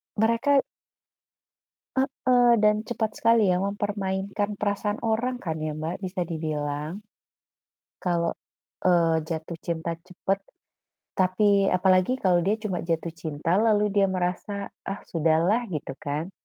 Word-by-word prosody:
Mereka 230 Hz, +6 st, +3 dB, 1.3 s
Heeh, 255 Hz, -2 st, +3 dB
dan 210 Hz, 0 st, +5 dB
cepat 220 Hz, -2 st, -1 dB
sekali 230 Hz, -1 st, +4 dB
ya 180 Hz, -, +2 dB
mempermainkan 200 Hz, 0 st, -2 dB
perasaan 205 Hz, 0 st, -1 dB
orang 250 Hz, +3 st, 0 dB
kan 160 Hz, -3 st, -2 dB
ya, 155 Hz, -, -1 dB
Mbak, 160 Hz, +3 st, -3 dB
bisa 185 Hz, 0 st, -3 dB
dibilang. 150 Hz, 0 st, -3 dB, 1.1 s
Kalau, 170 Hz, -2 st, +1 dB, 0.5 s
eee, 170 Hz, -2 st, +4 dB
jatuh 165 Hz, 0 st, -4 dB
cinta 165 Hz, 0 st, -3 dB
cepat 185 Hz, +2 st, -2 dB, 0.8 s
tapi 195 Hz, +1 st, +3 dB
apalagi 185 Hz, +5 st, +3 dB
kalau 185 Hz, -8 st, +3 dB
dia 195 Hz, +5 st, +1 dB
cuma 215 Hz, -5 st, -3 dB
jatuh 165 Hz, 0 st, -2 dB
cinta 160 Hz, +3 st, -1 dB
lalu 210 Hz, -2 st, +3 dB
dia 200 Hz, -1 st, +3 dB
merasa, 190 Hz, +2 st, -2 dB, 0.2 s
"Ah, 195 Hz, +1 st, -4 dB
sudahlah," 170 Hz, +8 st, +2 dB
gitu 150 Hz, -6 st, -4 dB
kan, 150 Hz, +6 st, -3 dB
190 Hz, 120 wpm, -26 LUFS, 165-210 Hz, 1.3 s, dan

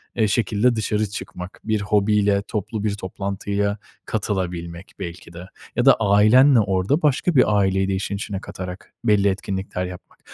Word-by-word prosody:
eee, 110 Hz, -2 st, +2 dB
şekilde 110 Hz, +3 st, +1 dB
dışarı 105 Hz, -1 st, -1 dB
çıkmak, 95 Hz, -2 st, -8 dB
bir 110 Hz, -1 st, 0 dB
hobiyle 105 Hz, -1 st, +2 dB
toplu 105 Hz, 0 st, -4 dB
bir 105 Hz, -2 st, 0 dB
toplantıya 100 Hz, +1 st, -3 dB, 0.3 s
katılabilmek 90 Hz, -4 st, -4 dB
belki 85 Hz, 0 st, -8 dB
de 85 Hz, +1 st, -9 dB, 0.3 s
ya 120 Hz, -, +1 dB
da 135 Hz, -, +8 dB
ailenle 110 Hz, +6 st, +5 dB
orada 100 Hz, -, +1 dB
başka 150 Hz, +3 st, +1 dB
bir 105 Hz, -5 st, +4 dB
aileyi 95 Hz, -1 st, +2 dB
de 95 Hz, -, 0 dB
işin 95 Hz, +1 st, -3 dB
içine 100 Hz, -1 st, -4 dB
katarak 90 Hz, 0 st, -8 dB
belli 105 Hz, -3 st, +4 dB
etkinlikler 95 Hz, -1 st, -2 dB
yapmak. 90 Hz, -1 st, -11 dB
100 Hz, 150 wpm, -22 LUFS, 95-110 Hz, 0.3 s, da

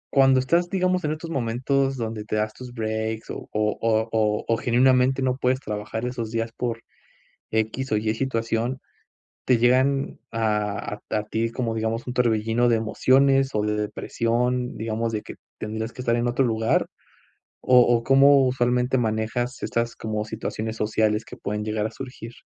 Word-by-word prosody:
¿Cuándo 135 Hz, -1 st, +6 dB
estás, 170 Hz, +7 st, +1 dB
digamos, 185 Hz, -1 st, +1 dB
en 150 Hz, -, 0 dB
estos 165 Hz, +1 st, -7 dB
momentos 135 Hz, +2 st, 0 dB
donde 110 Hz, -2 st, -4 dB
te 110 Hz, -, -3 dB
das 110 Hz, 0 st, -1 dB
tus 125 Hz, -1 st, -10 dB
breaks 110 Hz, -1 st, -3 dB
o -, -, -8 dB
o 105 Hz, 0 st, 0 dB
o 110 Hz, 0 st, +1 dB
o 105 Hz, -1 st, +1 dB
o 115 Hz, -, +2 dB
genuinamente 130 Hz, +2 st, +3 dB
no 130 Hz, 0 st, +1 dB
puedes 130 Hz, 0 st, +1 dB
trabajar 105 Hz, 0 st, -4 dB
esos 120 Hz, -3 st, -3 dB
días 115 Hz, 0 st, -2 dB
por 115 Hz, -2 st, -3 dB, 0.7 s
equis 110 Hz, +4 st, -1 dB
o 105 Hz, -, +3 dB
ye 110 Hz, +1 st, 0 dB
situación, 115 Hz, 0 st, -1 dB, 0.7 s
te 125 Hz, -3 st, +3 dB
llegan 130 Hz, +3 st, +2 dB
a 105 Hz, -2 st, -1 dB, 0.2 s
a -, -, +2 dB
a -, -, -4 dB
ti 115 Hz, +2 st, -1 dB
como 115 Hz, -2 st, -2 dB
digamos, 110 Hz, +2 st, -2 dB
un 125 Hz, -, -3 dB
torbellino 115 Hz, 0 st, +2 dB
de 115 Hz, -1 st, +3 dB
emociones 135 Hz, +4 st, +3 dB
o 105 Hz, -, +1 dB
de 105 Hz, 0 st, 0 dB
depresión, 120 Hz, +4 st, -1 dB
digamos 115 Hz, +1 st, -2 dB
de 105 Hz, -1 st, -2 dB
que -, -, -10 dB, 0.2 s
tendrías 110 Hz, +1 st, -4 dB
que 125 Hz, -, -7 dB
estar 120 Hz, -1 st, +1 dB
en 120 Hz, 0 st, 0 dB
otro 125 Hz, +3 st, +1 dB
lugar, 110 Hz, -1 st, +1 dB, 0.7 s
o 125 Hz, -1 st, +5 dB
o 120 Hz, -1 st, +3 dB
cómo 135 Hz, +1 st, +6 dB
usualmente 125 Hz, 0 st, +1 dB
manejas 115 Hz, +2 st, -1 dB
estas 115 Hz, 0 st, -1 dB
como 105 Hz, -1 st, -3 dB
situaciones 110 Hz, 0 st, -4 dB
sociales 110 Hz, 0 st, +1 dB
que -, -, -10 dB
pueden 105 Hz, +1 st, -3 dB
llegar 105 Hz, 0 st, -2 dB
a -, -, -4 dB
surgir? 120 Hz, -1 st, -9 dB
115 Hz, 175 wpm, -24 LUFS, 110-130 Hz, 0.7 s, Cuándo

